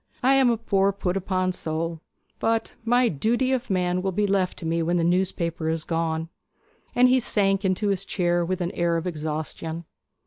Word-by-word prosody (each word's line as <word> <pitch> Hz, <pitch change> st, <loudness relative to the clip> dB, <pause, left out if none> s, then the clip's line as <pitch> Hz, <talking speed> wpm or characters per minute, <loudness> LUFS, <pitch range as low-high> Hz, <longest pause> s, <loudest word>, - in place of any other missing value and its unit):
I 265 Hz, +2 st, +5 dB
am 270 Hz, -2 st, +5 dB
a 235 Hz, -, +2 dB
poor 200 Hz, -3 st, +2 dB
put 190 Hz, -2 st, -2 dB
upon 185 Hz, -1 st, 0 dB
soul; 165 Hz, -1 st, -3 dB, 0.4 s
but 225 Hz, 0 st, 0 dB
my 245 Hz, +2 st, +3 dB
"Duty 235 Hz, -, +1 dB
of 255 Hz, -2 st, -1 dB
Man" 180 Hz, -1 st, +1 dB
will 190 Hz, 0 st, -1 dB
be 205 Hz, +3 st, +1 dB
left 195 Hz, -2 st, 0 dB
to 165 Hz, -, -8 dB
me 165 Hz, +1 st, 0 dB
when 170 Hz, +2 st, +1 dB
the 170 Hz, -, +1 dB
newspaper 170 Hz, -2 st, 0 dB
is 160 Hz, -1 st, 0 dB
gone.' 165 Hz, 0 st, -2 dB, 0.7 s
And 250 Hz, +1 st, +6 dB
he 255 Hz, +1 st, +4 dB
sank 195 Hz, -4 st, +1 dB
into 190 Hz, +2 st, +1 dB
his 195 Hz, -1 st, 0 dB
chair 175 Hz, -3 st, 0 dB
with 185 Hz, +2 st, -2 dB
an 175 Hz, 0 st, -1 dB
air 170 Hz, -1 st, 0 dB
of 165 Hz, -, -4 dB
exhaustion. 160 Hz, 0 st, -4 dB
185 Hz, 195 wpm, -25 LUFS, 165-205 Hz, 0.7 s, And